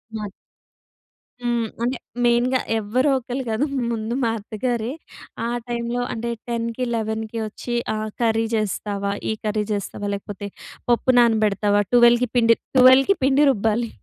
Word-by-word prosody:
మా 215 - -4
అత్ 200 - -7 1.1
హ్మ్. 240 -2 0 0.2
అంటే 250 +2 0 0.3
మెయిన్‌గా 240 +2 +3 0.2
ఎవరో 245 +7 +1
ఒకళ్ళు 255 +1 -4
కాదు. 220 +6 +1 0.3
ముందు 225 0 -3
మా 230 - +2
అత్తగారే, 225 +3 -3 0.5
ఆ - - 0 0.2
టైమ్‌లో 240 +1 -2
అంటే 235 +1 -4 0.2
10కి 235 +1 -2
11కి 220 0 -3
వచ్చి 240 +3 -5 0.2
ఆహ్, 215 0 -3
కర్రీ 225 -1 +2
చేస్తావా? 200 -1 -2 0.2
ఈ - - +1
కర్రీ 210 0 0
చేస్తావా? 205 0 -4
లేకపోతే 200 0 -7 0.4
పప్పు 240 +2 +3
నానబెడతావా? 210 -3 +3
12కి 240 0 +5
పిండి 230 -1 +5 0.2
12కి 260 +8 +7
పిండి 275 +2 +4
రుబ్బాలి. 225 +1 0
230 Hz, 135 wpm, -22 LUFS, 215-245 Hz, 1.1 s, 12కి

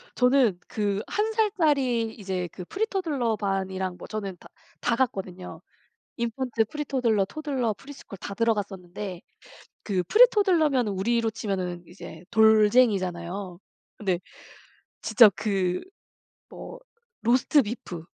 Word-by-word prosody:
저는 250 -7 +3
그 205 -1 -1
1 430 +2 0
살짜리 290 - +1
이제 190 -4 -4
그 180 - -8
프리토들러 325 - -1
반이랑 190 -2 -2
뭐 - - -10
저는 200 -4 -5
다 - - -14 0.3
다 230 - +1
갔거든요. 190 -7 -3 0.6
인펀트, 235 -1 -1
프리토들러, 250 -7 0
토들러, 265 -2 -2
프리스쿨 275 -8 -11
다 200 - -7
들어갔었는데 195 -4 -2 0.6
그 190 -4 0
프리토들러면 360 - +4
우리로 225 +4 0
치면은 185 -5 -4
이제 175 -1 -11
돌쟁이잖아요. 205 -5 +3 0.4
근데 185 -4 -1 0.8
진짜 225 -5 +7
그 190 -4 -1 0.7
뭐 - - -9 0.4
로스트비프 235 - +1
220 Hz, 265 characters per minute, -26 LUFS, 190-260 Hz, 0.8 s, 진짜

